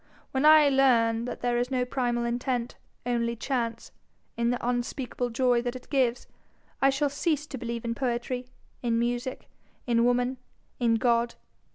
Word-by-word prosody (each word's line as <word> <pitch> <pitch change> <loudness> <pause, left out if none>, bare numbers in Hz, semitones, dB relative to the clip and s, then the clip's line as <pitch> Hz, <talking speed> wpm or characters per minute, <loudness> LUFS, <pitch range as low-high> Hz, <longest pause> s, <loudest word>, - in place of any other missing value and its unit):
When 265 +2 +1
I 310 -1 +8
learn 235 -4 +3
that 245 - -6
there 240 -1 +1
is 245 +1 -1
no 255 -2 0
primal 240 -2 -1
intent 245 0 -2 0.3
only 235 -1 0
chance 230 -2 -3 0.4
in 235 0 +1
the 245 -1 -1
unspeakable 245 0 -2
joy 245 0 +2
that 245 +1 -3
it 255 - -11
gives, 255 -4 +1 0.6
I 270 - +6
shall 275 +2 +1
cease 295 +1 -1
to 270 -4 -7
believe 235 -1 -4
in 230 - -1
poetry, 245 0 -2 0.3
in 235 -2 +1
music, 245 +2 -2 0.4
in 235 -2 +2
woman, 245 +1 +1 0.4
in 235 -2 +3
God. 235 0 +1
245 Hz, 160 wpm, -27 LUFS, 235-260 Hz, 0.6 s, I